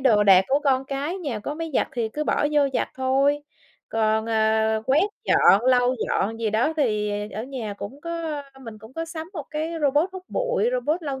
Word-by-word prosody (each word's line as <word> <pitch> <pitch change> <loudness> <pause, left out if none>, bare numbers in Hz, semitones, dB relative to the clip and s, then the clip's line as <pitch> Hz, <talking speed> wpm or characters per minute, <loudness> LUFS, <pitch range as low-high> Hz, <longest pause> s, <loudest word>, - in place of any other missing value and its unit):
đồ 220 -6 +4
đạc 190 -2 +7
của 280 +2 +2
con 265 -1 +2
cái 285 +7 -3
nhà 280 -11 -3
có 290 +8 -4
máy 325 0 -5
giặt - - +2
thì 235 -3 -1
cứ 300 +7 -4
bỏ 295 - +1
vô 295 - +4
giặt - - 0
thôi, 275 +3 +1 0.5
còn, 220 0 +1
ờ, 220 0 +2
quét 280 +5 +4 0.2
dọn, 205 +5 +5
lau 250 0 +4
dọn 225 +4 -1
gì 220 - 0
đó 235 +9 +1
thì 210 -7 +1 0.2
ở 215 - -5
nhà 245 -6 -5
cũng 265 +8 -8
có 330 -3 -4 0.2
mình 225 -4 -9
cũng 220 +4 -14
có 330 0 -3
sắm 325 0 -7
1 305 -7 -6
cái 315 +2 -3
robot 290 +5 +3
hút 375 -1 -8
bụi, - - 0
robot 360 -9 -1
lau 275 -3 -4
265 Hz, 210 wpm, -24 LUFS, 220-305 Hz, 0.5 s, đạc